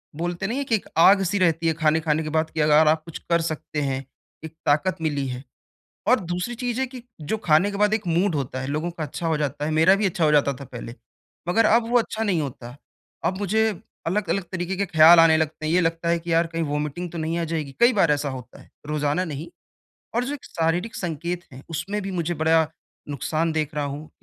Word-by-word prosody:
बोलते 175 +3 -3
नहीं 240 +5 -2
हैं 280 - -2
कि 225 - +3
एक 205 - -3
आग-सी 195 +2 +5
रहती 165 -2 +2
है 160 - +3
खाने 155 0 +2
खाने 155 0 0
के 155 - -4
बाद 160 0 0
कि 160 - -5
अगर 150 +1 +5
आप 155 0 +3
कुछ 165 - -7
कर 170 0 +3
सकते 155 -2 -3
हैं, 135 -1 -2 0.4
एक 160 - -9
ताकत 165 +6 +2
मिली 145 -4 -1
है। 125 +1 -5 0.6
और 250 +1 +5
दूसरी 180 +6 -4
चीज़ 245 +1 -3
है - - +2
कि 250 -2 -10 0.2
जो 220 +9 -2
खाने 180 +1 +3
के 200 - -5
बाद 210 +1 +3
एक 210 -4 -1
मूड 170 +1 +1
होता 130 -2 -3
है। 130 - -4
लोगों 155 +4 -2
का 165 -2 -6
अच्छा 165 +3 -4
हो 160 -2 +1
जाता 145 0 -2
है। 155 - -1
मेरा 160 +5 +5
भी 205 0 0
अच्छा 175 -3 0
हो 150 - +4
जाता 140 -1 +3
था 135 +2 -10
पहले। 120 -1 -8 0.5
मगर 225 +6 +3
अब 230 +1 +3
वो 245 - +4
अच्छा 225 -1 -2
नहीं 185 -7 +1
होता। 125 -2 -7 0.5
अब 185 +3 0
मुझे 210 +2 +1 0.4
अलग-अलग 195 +1 0
तरीक़े 185 +1 -3
के 200 - 0
ख़्याल 165 -1 +7
आने 160 -1 +6
लगते 155 0 -2
हैं। 160 - 0
ये 180 - +4
लगता 165 +1 -1
है 170 0 +2
कि 170 0 -3
यार 165 0 +3
कहीं 165 0 -3
वोमिटिंग 150 +3 -3
तो 170 - -6
नहीं 160 +1 -2
आ - - -1
जाएगी 150 -4 -3
कई 240 +1 +6
बार 170 -7 +3
ऐसा 145 -1 0
होता 125 -2 -9
है - - -19 0.2
रोज़ाना 150 +3 0
नहीं। 155 +1 -6 0.7
और 240 - +2
जो 285 - -3
एक 285 - -8
शारीरिक 170 +6 -1
संकेत 175 +1 -4
है 130 - -10
उसमें 195 +6 -3
भी 195 0 -5
मुझे 175 -1 -1
बड़ा 160 0 +3 0.4
नुक़सान 155 +4 -1
देख 155 -1 -2
रहा 145 -1 -1
हूँ। 145 +2 -6
165 Hz, 240 wpm, -24 LUFS, 150-185 Hz, 0.7 s, ख़्याल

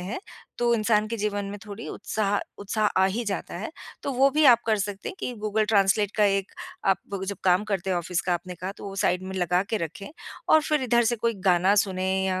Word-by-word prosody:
हैं, 190 - -5 0.4
तो 240 -1 +3
इंसान 215 -1 +2
के 230 - -3
जीवन 205 -1 -2
में 200 +1 -6
थोड़ी 210 +2 -7
उत्साह 205 -1 -1 0.2
उत्साह 210 +1 0 0.2
आ - - +6
ही 225 +5 -2
जाता 200 -2 -4
है। - - -5 0.3
तो 280 - -2
वो 270 +2 +4
भी 300 +2 +2
आप 240 -3 +7
कर 220 -1 +3
सकते 200 0 -4
हैं - - -8
कि 250 - -3
गूगल 215 +1 0
ट्रांसलेट 205 -1 +3
का 210 - +4
एक 195 -1 +1 0.3
आप 195 - +4 0.3
जब 200 - -3
काम 185 +2 +4
करते 195 -3 -2
हो 180 - +1
ऑफिस 175 +2 -2
का 180 - -1
आपने 180 +1 -5
कहा 185 +3 -5
तो - - -10
वो 195 - -8
साइड 185 -2 +1
में 190 0 -6
लगा 180 +1 +2
के 225 - +1
रखें 170 +2 -5 0.4
और 315 - +7
फिर 300 -3 0
इधर 240 -1 +3
से 240 +1 +1
कोई 230 +1 0
गाना 185 +2 +4
सुनें 190 -1 +1
या 185 -1 0
205 Hz, 235 wpm, -26 LUFS, 190-220 Hz, 0.4 s, आप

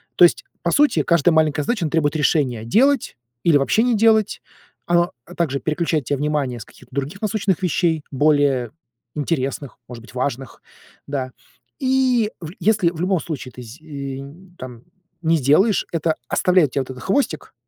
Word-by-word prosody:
То 175 - +8
есть, 175 - +1 0.2
по 170 - +1
сути, 295 0 +3
каждая 170 0 +3
маленькая 155 -2 +2
задача, 205 - -1
она 155 - -3
требует 155 -2 +1
решения: 140 -6 +1
делать 260 - +2 0.3
или 160 -4 +5
вообще 180 +11 +2
не 245 -2 +2
делать. 220 -1 +3 0.5
Оно, 175 0 +2 0.2
э, 175 - -12
также 140 -6 -1
переключает 155 -2 -1
те 145 - 0
внимание 145 -4 -1
с 105 - -9
каких-то - - -19
других 145 +9 -4
насущных 210 -4 0
вещей, 165 -3 +1
более 140 -4 +2 0.4
интересных, 140 -2 -3
может 120 -2 -9
быть, 125 - -15
важных, 130 0 -4 0.5
да. 130 -3 -3 0.5
И 255 -4 +2
вл 160 -1 -7
если 205 -5 +2
в 170 -1 -7
любом 185 -1 +1
случае 140 -6 -6
ты 125 - -11
з 115 +6 -12
э, - - -21 0.4
нь 175 +6 -14
там, 125 -2 -9 0.4
не 165 0 +2
сделаешь, 155 - +3
это 160 -1 0
оставляет 180 -7 +3
те - - -1
вот 130 - -8
этот 130 - -10
хвостик, 275 +8 -1
160 Hz, 175 wpm, -21 LUFS, 140-185 Hz, 0.5 s, То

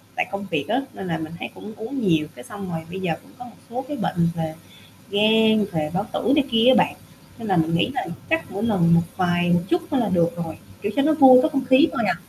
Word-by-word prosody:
tại 365 - -1
công 200 0 -5
việc 145 -4 -1
á, 255 - +1
nên 190 - -7
là 165 -1 -1
mình 160 0 -7
thấy - - -5
cũng 215 - -10
uống 230 +5 -5
nhiều, 155 -3 +2
cái 120 - -11
xong 200 -3 -8
rồi 165 - -3
bây 190 - -5
giờ 180 -4 -1
cũng - - -20
có 245 - -8
một 240 - -14
số 250 +3 -4
cái 295 - -5
bệnh 170 -8 0
về 160 -1 -4 0.6
gan, 220 +1 +4
về 155 -2 -2
bao 195 +4 -1
tử 250 - 0
này 290 - +4
kia 230 0 +3
á 260 - +7
bạn, - - -7 0.4
nên 225 -2 -6
là 190 - +2
mình 165 0 +1
nghĩ 170 - +1
là - - -2 0.2
chắc 325 0 0
mỗi 200 +2 -4
lần 180 -7 +3
một 170 - +4
vài, 175 -1 +1
một 175 0 +3
chút 345 +1 +1
thôi 275 - +1
là 230 - 0
được 170 -2 +1
rồi, 160 - -7 0.3
kiểu, 205 - -2
cho 275 - +3
nó 310 +2 +3
vui 265 -3 +8
có 310 - +2
không 275 -3 -2
khí 260 +5 +5
thôi - - -1
à, - - +2
200 Hz, 275 wpm, -22 LUFS, 170-255 Hz, 0.6 s, vui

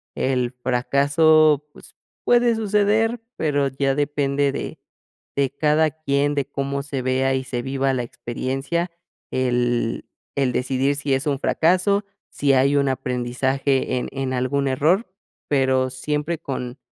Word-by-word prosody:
el 125 -2 0
fracaso, 145 +4 +3
pues - - -16 0.3
puede 240 -1 +4
suceder, 215 +2 +1 0.2
pero 145 -3 +1
ya 135 0 0
depende 145 -1 0
de - - -5 0.6
de 140 -2 +2
cada 150 +2 +2
quién, 145 -1 0
de 140 -2 0
cómo 140 0 -3
se 140 -2 -4
vea 130 +1 +1
y 130 - -1
se 125 -2 -4
viva 135 0 0
la 125 - -1
experiencia, 135 +9 -3 0.4
el 120 -2 0 0.3
el 135 -2 +1
decidir 135 +3 0
si 140 -2 0
es 135 - -2
un 140 -2 0
fracaso, 185 +7 +2 0.2
si 140 -1 +1
hay 135 +2 +3
un 140 -1 +2
aprendizaje 130 +1 -1
en - - -2
en 135 -1 -3
algún 135 +2 0
error, 160 - +2 0.4
pero 130 -2 +2
siempre 150 +5 -2
con 125 -2 -5
140 Hz, 140 wpm, -22 LUFS, 130-150 Hz, 0.6 s, puede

